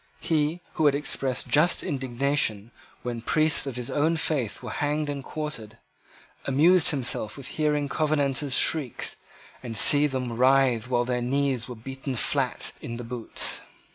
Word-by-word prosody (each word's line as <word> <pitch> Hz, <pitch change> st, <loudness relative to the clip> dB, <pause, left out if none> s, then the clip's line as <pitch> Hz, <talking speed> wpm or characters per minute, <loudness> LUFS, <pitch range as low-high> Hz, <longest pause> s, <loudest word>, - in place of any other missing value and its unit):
He, 160 Hz, +2 st, -1 dB
who 155 Hz, -2 st, +2 dB
had 140 Hz, -, +3 dB
expressed 135 Hz, -3 st, -2 dB
just 155 Hz, +4 st, +3 dB
indignation 130 Hz, -5 st, -1 dB, 0.3 s
when 120 Hz, -1 st, -4 dB
the -, -, -14 dB
priests 155 Hz, 0 st, +3 dB
of 135 Hz, -, -5 dB
his 125 Hz, -1 st, -5 dB
own 160 Hz, +3 st, +1 dB
faith 140 Hz, -9 st, -1 dB
were -, -, -6 dB
hanged 150 Hz, 0 st, -1 dB
and 140 Hz, -1 st, -6 dB
quartered, 130 Hz, -9 st, -6 dB, 0.7 s
amused 160 Hz, +6 st, +4 dB
himself 125 Hz, -7 st, -1 dB
with 140 Hz, -, -9 dB
hearing 150 Hz, -1 st, -1 dB
Covenanters 145 Hz, -3 st, 0 dB
shriek 145 Hz, -8 st, +1 dB, 0.5 s
and 115 Hz, -3 st, -5 dB
seeing 145 Hz, +7 st, +7 dB
them 125 Hz, -3 st, -3 dB
writhe 130 Hz, -2 st, +3 dB
while 120 Hz, -1 st, +1 dB
their 125 Hz, 0 st, -1 dB
knees 130 Hz, -1 st, -1 dB
were 125 Hz, -, -6 dB
beaten 135 Hz, +3 st, -6 dB
flat -, -, -1 dB
in 115 Hz, 0 st, -6 dB
the 120 Hz, -, -7 dB
boots. 120 Hz, -1 st, -1 dB
135 Hz, 155 wpm, -25 LUFS, 120-150 Hz, 0.7 s, seeing